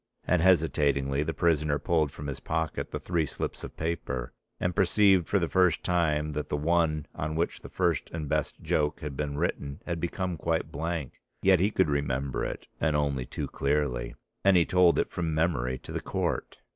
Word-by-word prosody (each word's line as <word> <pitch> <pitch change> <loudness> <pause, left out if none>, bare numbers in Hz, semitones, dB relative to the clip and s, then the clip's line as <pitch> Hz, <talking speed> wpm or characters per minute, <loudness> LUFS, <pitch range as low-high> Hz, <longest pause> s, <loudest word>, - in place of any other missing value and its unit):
And 90 -1 +2
hesitatingly 70 -6 +3
the 80 +2 -1
prisoner 75 -3 +2
pulled 75 0 +1
from 75 - -8
his 70 -2 -4
pocket 80 -1 -2
the - - -4
three 85 -4 0
slips - - -4
of - - -8
paper: 65 -7 -3 0.3
and 90 -1 -1
perceived 95 -1 +4
for 100 - +2
the 85 -3 +1
first 90 -2 +3
time 75 -4 +1
that 75 0 -4
the 75 - 0
one 80 -1 +1
on 75 +1 -3
which 85 +1 -1
the - - -10
first 85 -5 0
and 80 -2 -5
best 75 +1 -1
joke 75 -1 0
had 75 -2 -5
been 70 0 -3
written 70 -3 -2
had 85 -2 -2
become 90 +1 -2
quite 80 +1 -1
blank. 80 -3 -4 0.2
Yet 95 -2 +6
he 100 +3 +3
could 95 -4 +2
remember 70 -2 -1
it, - - -4
and 80 -2 +1
only 70 -4 0
too - - -4
clearly. 70 -4 -1 0.3
And 100 -2 +6
he 85 - +5
told 90 -3 +4
it - - 0
from 85 -3 -2
memory 70 -6 +1
to - - -10
the - - -3
Court. - - -2
80 Hz, 195 wpm, -28 LUFS, 70-85 Hz, 0.3 s, Yet